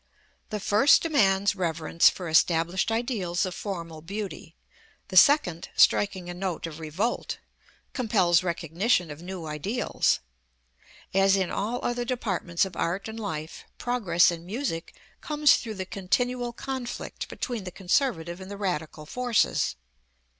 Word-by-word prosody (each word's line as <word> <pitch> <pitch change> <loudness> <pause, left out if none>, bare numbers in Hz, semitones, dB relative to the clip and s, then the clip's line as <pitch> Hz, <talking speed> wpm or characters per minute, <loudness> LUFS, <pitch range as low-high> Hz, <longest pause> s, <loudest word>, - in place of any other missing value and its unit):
The 210 - -3
first 210 +8 +5
demands 205 -11 +3
reverence 165 -2 +3
for 180 - -6
established 165 +5 +2
ideals 220 -8 -1
of 185 - -4
formal 170 -5 -6
beauty; 195 -1 -6 0.5
the 190 - -6
second, 185 - +5
striking 190 -3 +3
a 175 - -5
note 180 -2 -3
of 165 -1 -7
revolt, 165 +10 -2 0.6
compels 195 -9 +3
recognition 175 +1 0
of 145 +2 -9
new 180 -1 -6
ideals. 160 - 0 0.9
As 195 0 +4
in 190 -2 0
all 225 +5 -2
other 240 0 -1
departments 195 -8 -1
of 185 -2 -8
art 180 +5 -2
and 220 +1 -7
life, 160 -7 -5
progress 195 -9 +3
in 165 -1 -6
music 185 -3 -4 0.3
comes 300 -1 +4
through 220 -2 -6
the 190 -1 -4
continual 245 +6 -1
conflict 260 0 -5
between 240 -5 -4
the 185 - -5
conservative 175 - 0
and 190 - -9
the 200 - -6
radical 160 -6 -3
forces. 235 - +1
190 Hz, 135 wpm, -27 LUFS, 170-230 Hz, 0.9 s, first